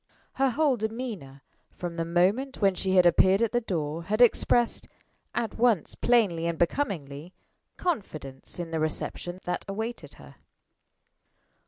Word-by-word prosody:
Her 270 0 +2
whole 280 0 +2
demeanor, 215 - -5 0.3
from 175 -1 -6
the 165 -1 -2
moment 195 +11 +1
when 195 -2 +4
she 190 +1 -1
had 180 -1 +6
appeared 190 +4 +5
at 230 - +1
the 240 - +1
door, 165 -5 -3
had 215 +4 -1
expressed 240 0 +3 0.5
at 230 -2 -2
once 230 -8 +2
plainly 200 -9 +2
and 170 -1 -2
becomingly 170 - -2 0.4
confidence 155 - -4
in 170 -2 -5
the 160 - -1
reception 175 +3 -3
that 180 - -3
awaited 210 -6 -5
her. 70 -1 -15
190 Hz, 140 wpm, -27 LUFS, 165-235 Hz, 0.5 s, had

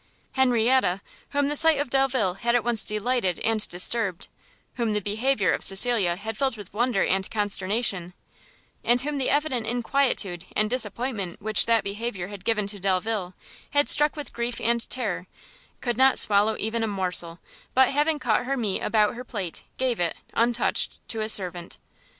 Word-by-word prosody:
Henrietta, 245 -6 +2 0.3
whom 285 0 0
the 295 - -2
sight 320 -1 +3
of 285 -4 -3
Delvile 265 -8 +1
had 235 +5 -1
at 240 - +2
once 235 -3 +2
delighted 215 -3 -1
and 225 -1 -1
disturbed, 185 +1 +2 0.4
whom 230 -3 -1
the 210 - 0
behaviour 210 -1 0
of - - -1
Cecilia 195 -3 +4
had 220 +4 -6
filled 265 0 -1
with 205 -3 -11
wonder 235 -2 +1
and 190 0 -1
consternation, 200 -3 -1 0.7
and 240 +1 +3
whom 290 +1 -3
the 265 - 0
evident 280 -6 0
inquietude 235 -7 -1
and 215 +1 0
disappointment 225 -5 -1
which 215 0 +2
that 230 -2 +3
behaviour 200 -2 -5
had 200 -3 -10
given 215 -3 0
to 200 0 -7
Delvile, 190 0 -2 0.4
had 290 0 +2
struck 295 +1 +5
with 295 -2 -8
grief 235 0 -3
and 235 0 -1
terror, 195 -8 -3 0.5
could 240 -3 -2
not 265 +1 +4
swallow 210 +1 +3
even 220 +2 -2
a 225 - 0
morsel, 180 -4 +1 0.4
but 260 0 +5
having 295 +2 +1
cut 245 -3 0
her 275 0 -1
meat 215 -6 -2
about 215 -2 +1
her 245 - -8
plate, 200 -9 -6
gave 255 -4 -1
it, 170 -1 -1 0.2
untouched, 235 +1 +1
to 225 - -1
a 215 - -2
servant. 180 -4 +1
225 Hz, 170 wpm, -25 LUFS, 195-250 Hz, 0.7 s, struck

